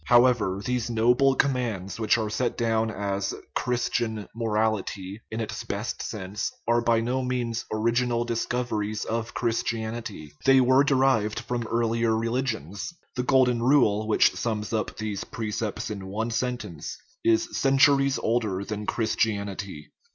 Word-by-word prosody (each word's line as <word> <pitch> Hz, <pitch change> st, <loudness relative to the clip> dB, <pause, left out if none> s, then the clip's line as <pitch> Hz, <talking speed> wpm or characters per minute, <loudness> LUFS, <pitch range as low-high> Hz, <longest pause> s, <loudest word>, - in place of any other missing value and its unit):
However, 120 Hz, -6 st, +4 dB
these 125 Hz, -2 st, -1 dB
noble 125 Hz, +4 st, +4 dB
commands, 120 Hz, -9 st, -1 dB
which 110 Hz, +1 st, +3 dB
are 110 Hz, -2 st, -2 dB
set 120 Hz, +2 st, -1 dB
down 115 Hz, -1 st, +1 dB
as 100 Hz, -1 st, -2 dB
" -, -, -33 dB
Christian 120 Hz, -3 st, -1 dB
" -, -, -41 dB
morality 110 Hz, -3 st, -1 dB
(in 110 Hz, -, -4 dB
its 110 Hz, -1 st, -4 dB
best 105 Hz, +4 st, -3 dB
sense), 100 Hz, -1 st, -4 dB, 0.2 s
are 120 Hz, 0 st, +3 dB
by 115 Hz, -1 st, +3 dB
no 125 Hz, +3 st, 0 dB
means 125 Hz, -3 st, -2 dB
original 120 Hz, +2 st, +1 dB
discoveries 115 Hz, -3 st, -2 dB
of 115 Hz, +1 st, -3 dB
Christianity; 115 Hz, -, -2 dB
they 135 Hz, 0 st, +6 dB
are 130 Hz, +1 st, +5 dB
derived 130 Hz, -6 st, +2 dB
from 120 Hz, -1 st, -3 dB
earlier 115 Hz, -1 st, +1 dB
religions. 115 Hz, -, -2 dB, 0.2 s
The 125 Hz, -, 0 dB
Golden 125 Hz, -2 st, +3 dB
Rule, 115 Hz, -5 st, +3 dB
which 110 Hz, -, +4 dB
sums 110 Hz, -2 st, -3 dB
up 110 Hz, -1 st, -2 dB
these 105 Hz, -2 st, -3 dB
pre 110 Hz, -2 st, -5 dB
cepts 110 Hz, +1 st, -3 dB
in 100 Hz, -2 st, -6 dB
one 110 Hz, +4 st, -2 dB
sentence, 110 Hz, -, -3 dB, 0.3 s
is 340 Hz, 0 st, +2 dB
centuries 135 Hz, 0 st, +4 dB
older 110 Hz, -4 st, 0 dB
than 105 Hz, 0 st, -5 dB
Chris 110 Hz, -2 st, 0 dB
tianity. 100 Hz, -6 st, -2 dB
115 Hz, 145 wpm, -26 LUFS, 105-125 Hz, 0.3 s, they